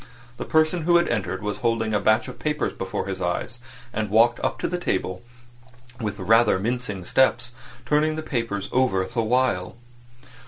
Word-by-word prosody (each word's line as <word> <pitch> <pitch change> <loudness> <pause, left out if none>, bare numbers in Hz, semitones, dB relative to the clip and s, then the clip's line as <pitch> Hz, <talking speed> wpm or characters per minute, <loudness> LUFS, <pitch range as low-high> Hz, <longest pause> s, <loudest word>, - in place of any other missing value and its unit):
The - - -5
person 160 +1 +2
who 175 0 +4
had 170 - +2
entered 95 -4 -2
was 105 0 -3
holding 115 -2 0
a 105 - +2
batch 110 +2 +2
of - - -9
papers 150 0 -1
before 95 0 -4
his 95 -1 -4
eyes 90 +7 -2 0.3
and 110 -1 -2
walked 115 +3 +4
up - - -1
to - - 0
the 180 +1 -3
table 95 - -2 0.8
with 105 -3 -3
a 95 - -6
rather 115 0 +4
mincing 105 -2 -3
step, 130 +8 +3 0.5
turning 155 +1 +2
the 155 - -4
papers 115 -8 -3
over 125 -8 +2
the 115 - -2
while. 115 -5 0
115 Hz, 180 wpm, -24 LUFS, 100-130 Hz, 0.8 s, who